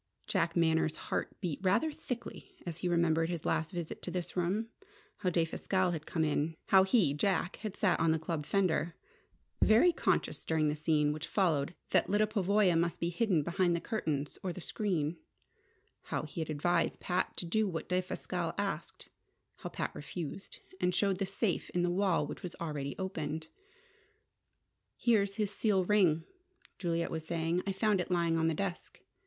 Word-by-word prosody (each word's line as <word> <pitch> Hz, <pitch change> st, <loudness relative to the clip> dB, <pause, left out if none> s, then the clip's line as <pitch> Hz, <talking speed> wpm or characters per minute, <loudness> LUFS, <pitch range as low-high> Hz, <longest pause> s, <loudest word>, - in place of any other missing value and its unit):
Jack 170 Hz, -4 st, 0 dB
Manners' 160 Hz, -2 st, +3 dB
heart -, -, -4 dB
beat 170 Hz, -7 st, -2 dB
rather 200 Hz, +12 st, +2 dB
thickly 245 Hz, -5 st, -7 dB
as 170 Hz, -2 st, -4 dB
he 180 Hz, 0 st, -1 dB
remembered 165 Hz, -1 st, +2 dB
his 170 Hz, -3 st, -4 dB
last 160 Hz, 0 st, +1 dB
visit 175 Hz, -4 st, -5 dB
to -, -, -5 dB
this 175 Hz, -1 st, -4 dB
room: 190 Hz, +6 st, 0 dB, 0.5 s
how 185 Hz, -, 0 dB
Defasquelle 180 Hz, +2 st, +1 dB
had 155 Hz, -3 st, -5 dB
come 160 Hz, -, 0 dB
in; 155 Hz, +1 st, 0 dB
how 190 Hz, -, +8 dB
he, 190 Hz, -, +3 dB
Jack, 180 Hz, +3 st, 0 dB
had 215 Hz, -3 st, -5 dB
sat 205 Hz, -, +2 dB
on 165 Hz, -, +3 dB
the 160 Hz, -, +3 dB
club 160 Hz, -1 st, -3 dB
fender, 170 Hz, -2 st, +1 dB, 0.7 s
very 240 Hz, +12 st, +6 dB
conscious -, -, 0 dB
during 155 Hz, -2 st, +1 dB
the 150 Hz, -, 0 dB
scene 150 Hz, -1 st, +2 dB
which 155 Hz, +2 st, -5 dB
followed 165 Hz, -5 st, +1 dB, 0.2 s
that -, -, +3 dB
Lyda 205 Hz, +2 st, +4 dB
Pavoya 200 Hz, -3 st, +3 dB
must 170 Hz, +1 st, +1 dB
be 170 Hz, -, 0 dB
hidden 180 Hz, -5 st, +2 dB
behind 175 Hz, +2 st, +2 dB
the -, -, 0 dB
curtains 155 Hz, -7 st, -2 dB
or 185 Hz, -, -2 dB
the 175 Hz, -, -7 dB
screen; 170 Hz, -5 st, -1 dB, 0.9 s
how -, -, -2 dB
he 155 Hz, +2 st, -5 dB
had 160 Hz, -, -4 dB
advised 165 Hz, +3 st, +1 dB
Pat 180 Hz, 0 st, -1 dB
to -, -, -3 dB
do 215 Hz, +5 st, +1 dB
what 165 Hz, -4 st, -4 dB
Defasquelle 185 Hz, 0 st, -2 dB
asked; -, -, -3 dB, 0.5 s
how -, -, -6 dB
Pat -, -, -3 dB
refused, 155 Hz, +5 st, -6 dB, 0.2 s
and 180 Hz, -1 st, +1 dB
showed 195 Hz, -2 st, +2 dB
the 195 Hz, -, 0 dB
safe 195 Hz, 0 st, -1 dB
in 175 Hz, -, +2 dB
the 175 Hz, -, +2 dB
wall 185 Hz, -1 st, +2 dB
which -, -, -7 dB
was 180 Hz, -, -6 dB
already 145 Hz, -4 st, -4 dB
open. 160 Hz, -5 st, -3 dB, 1.5 s
"Here's 200 Hz, -4 st, +2 dB
his 210 Hz, -2 st, 0 dB
seal 200 Hz, -2 st, +2 dB
ring," 180 Hz, -5 st, +3 dB, 0.6 s
Juliet 170 Hz, -2 st, -1 dB
was 160 Hz, -1 st, -3 dB
saying. 165 Hz, +1 st, 0 dB
"I -, -, +2 dB
found 200 Hz, 0 st, +2 dB
it 180 Hz, -, -5 dB
lying 170 Hz, -2 st, +2 dB
on 160 Hz, -, +2 dB
the 165 Hz, -, +1 dB
desk. 190 Hz, 0 st, -4 dB
175 Hz, 175 wpm, -32 LUFS, 160-195 Hz, 1.5 s, how